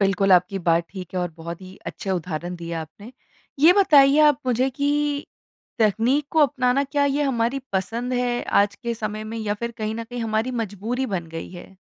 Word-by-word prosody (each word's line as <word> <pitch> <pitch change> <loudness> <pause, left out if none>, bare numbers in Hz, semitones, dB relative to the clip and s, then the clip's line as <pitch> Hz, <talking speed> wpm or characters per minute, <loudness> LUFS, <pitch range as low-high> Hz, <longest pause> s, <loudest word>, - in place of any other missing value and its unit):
बिल्कुल 195 0 +3
आपकी 180 +2 +3
बात 170 -1 +2
ठीक 185 -2 -9
है 180 - 0
और 175 -1 -2
बहुत 170 +2 -7
ही 185 +1 -12
अच्छे 195 - -5
उदाहरण 175 0 -3
दिए 170 0 -7
आपने। 205 +10 -13 0.5
ये 330 +4 +8
बताइए 295 -7 +6
आप 295 -4 +4
मुझे 250 +2 +2
कि 290 +1 -1 0.5
तकनीक 230 +7 +2
को 320 - 0
अपनाना 260 -1 +2
क्या 285 +1 0
ये 285 +1 +1
हमारी 250 -1 0
पसंद 230 +6 -2
है, 245 -1 0
आज 200 0 +2
के 235 -2 -4
समय 215 -1 -4
में 225 +1 -5
या 210 -2 -1
फ़िर 235 +3 -4
कहीं 215 0 -2
न 230 - -5
कहीं 245 +1 -7
हमारी 220 +2 -1
मजबूरी 225 +6 -3
बन 185 -6 -3
गई 165 0 -7
है? 185 +2 -12
225 Hz, 195 wpm, -23 LUFS, 190-260 Hz, 0.5 s, ये